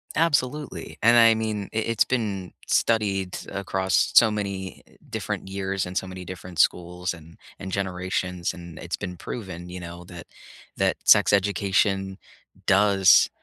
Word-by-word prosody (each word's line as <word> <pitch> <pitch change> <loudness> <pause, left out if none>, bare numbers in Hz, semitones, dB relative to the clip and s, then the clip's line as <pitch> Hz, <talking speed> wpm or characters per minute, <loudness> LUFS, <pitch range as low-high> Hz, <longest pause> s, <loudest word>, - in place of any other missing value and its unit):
Absolutely. 150 -2 -1
And, 120 +2 +6
I 115 -1 +7
mean, 110 -3 -3
i - - -3
it's 115 - +4
been 100 -7 -2 0.2
studied 100 -5 +1
across 95 -7 0
so 120 - +7
many 100 -3 -5 0.3
different - - -4
years 95 0 -2
and 90 +1 -5
so - - -1
many 95 0 -8
different 90 -1 -8
schools 90 +2 +1
and 80 -1 -14 0.2
and 95 0 -6
generations, 90 -2 -2
and 85 -2 -11
it's - - -4
been 90 - -6
proven, 90 -4 -7
you 90 +1 -7
know, 85 0 -9
that 85 -1 -11 0.5
that - - +1
sex - - +6
education 95 0 +1 0.5
does 100 -1 +5
95 Hz, 145 wpm, -25 LUFS, 90-105 Hz, 0.5 s, I